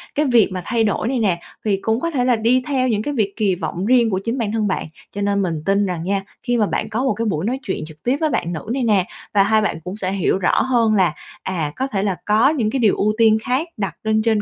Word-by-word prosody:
cái 300 - +2
việc 240 -7 +4
mà 185 - -3
thay 230 +2 +1
đổi 215 +1 0
này 255 -1 0
nè, 185 -6 +1 0.3
thì 205 -2 +2
cũng 225 +2 0
có 335 +3 -2
thể 250 -4 0
là 250 -2 +4
đi 240 +3 +2
theo 260 -3 +1
những 215 -3 +1
cái 290 +6 -3
việc 210 -6 0
kỳ 200 -5 +1
vọng 180 +2 -4
riêng 240 -1 +4
của 190 -2 0
chính 235 +3 -2
bản 220 -4 -1
thân 215 -1 0
bạn. 190 - -1 0.3
Cho 205 - -3
nên 200 0 +1
mình 165 -5 -2
tin 200 +1 +2
rằng 175 -3 -3
nha, 195 +1 0 0.2
khi 245 0 0
mà 215 - +3
bạn 215 - -2
có 230 +4 -1
một 265 - +2
cái 225 +3 -3
buổi 185 -4 -1
nói 255 +3 -1
chuyện 190 - -3
trực 155 -1 -14
tiếp 255 +4 +1
với 310 - +2
bạn 175 -8 -1
nữ 155 - -4
này 265 -2 -1
nè, 205 -5 +3 0.3
và 200 -1 +5
hai 215 +1 +3
bạn 185 -6 -1
cũng 185 +4 -6
sẽ 185 -2 -2
hiểu 190 -1 +1
rõ 180 - +2
hơn 230 -4 +2
là, 180 -5 +3 0.3
à, 165 -6 -2
có 265 +1 -1
thể 200 -6 -2
là 195 -3 0
có 220 +6 +4
những 240 -9 0
cái 265 - -1
điều 220 -4 +3
ưu 210 +1 +1
tiên 220 -1 +5
khác 265 +7 0
đặt 195 -4 -3
lên 220 0 +2
trên 220 -2 +2
215 Hz, 290 wpm, -20 LUFS, 195-240 Hz, 0.3 s, và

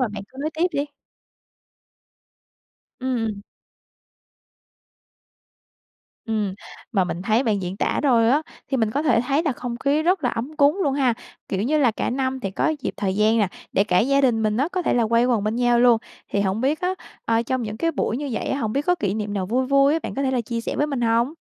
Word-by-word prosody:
Mà 250 - +2
bạn 210 -1 -6
cứ 260 - -19
nói 305 +2 -1
tiếp 330 +3 +2
đi. 285 -1 0 2.2
Ừm. 225 -5 -2 2.8
Ừm. 210 -4 -1 0.4
Mà 195 -4 +3
mình 180 0 -4
thấy 220 +5 +2
bạn 210 -6 0
diễn 180 +2 -4
tả - - 0
thôi 235 -5 +4
á, 290 +4 +3 0.3
thì 270 - 0
mình 225 -4 +1
có 285 +7 -1
thể 240 -7 +3
thấy 280 +5 +1
là 305 -5 0
không 245 -1 -5
khí 285 +4 +1
rất 360 -1 +1
là 245 - +2
ấm 270 +7 -5
cúng 290 +5 +4
luôn 280 -5 +1
ha. 260 -4 +2 0.3
Kiểu 195 +1 -1
như 305 +6 +1
là, 265 -5 +4
cả 220 - -2
năm 260 +1 -1
thì 195 - -3
có 310 +11 0
dịp - - -3
thời 190 -2 -1
gian 215 +2 +3
nè, 205 -3 +2 0.2
để 195 - +3
cả 180 -3 +2
gia 275 +7 +3
đình 240 -5 +2
mình 215 0 +1
á 280 +6 +1
có 365 - -1
thể - - +1
là 235 -2 +2
quây 235 +1 +3
quần 235 -5 +1
bên 215 +2 -1
nhau 245 -1 +3
luôn. 240 -1 +5 0.3
Thì 200 - +1
hổng 195 +2 0
biết 280 +5 0
á, 365 +1 0 0.3
ờ, 230 0 +2
trong 255 +1 -2
những 215 -1 -5
cái 330 +8 0
buổi 225 - -1
như 285 +2 -4
vậy 220 - -2
á, 270 - -1
hổng 220 -5 -2
biết 280 - 0
có 360 - +4
kỷ 205 - -2
niệm 210 -1 -3
nào 190 -2 -1
vui 255 +6 0
vui 275 +1 +4
á, 320 - +2
bạn - - -5
có 275 - -1
thể 265 - +1
là 255 -2 +1
chia 230 0 -3
sẻ - - -4
với 295 - +1
mình 280 -4 -3
hông? 235 +3 +2
245 Hz, 240 wpm, -23 LUFS, 215-275 Hz, 2.8 s, luôn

